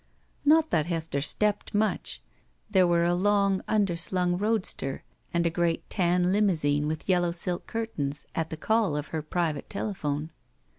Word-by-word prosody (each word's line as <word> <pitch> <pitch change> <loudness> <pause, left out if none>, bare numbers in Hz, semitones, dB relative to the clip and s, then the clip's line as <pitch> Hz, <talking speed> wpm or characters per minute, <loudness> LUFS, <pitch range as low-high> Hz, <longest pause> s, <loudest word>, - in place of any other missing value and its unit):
Not 315 +2 +4
that 155 -1 +2
Hester 160 -4 -2
stepped 210 +7 -1
much. 215 +1 -1 0.5
There 190 -3 +5
were 170 0 +3
a 175 +1 +2
long 200 +1 +2
underslung 180 -3 +1
roadster 200 -9 -1 0.3
and 170 0 +1
a 170 - +2
great 170 -1 -1
tan 180 -1 +2
limousine 155 -8 +2
with 155 0 -4
yellow 175 -2 +2
silk 175 +1 0
curtains 155 -12 -3
at 165 -1 -2
the 160 - -6
call 220 -4 +1
of 150 - -5
her 160 - -3
private 155 -2 -2
telephone. 155 -7 -3
175 Hz, 150 wpm, -27 LUFS, 160-200 Hz, 0.5 s, There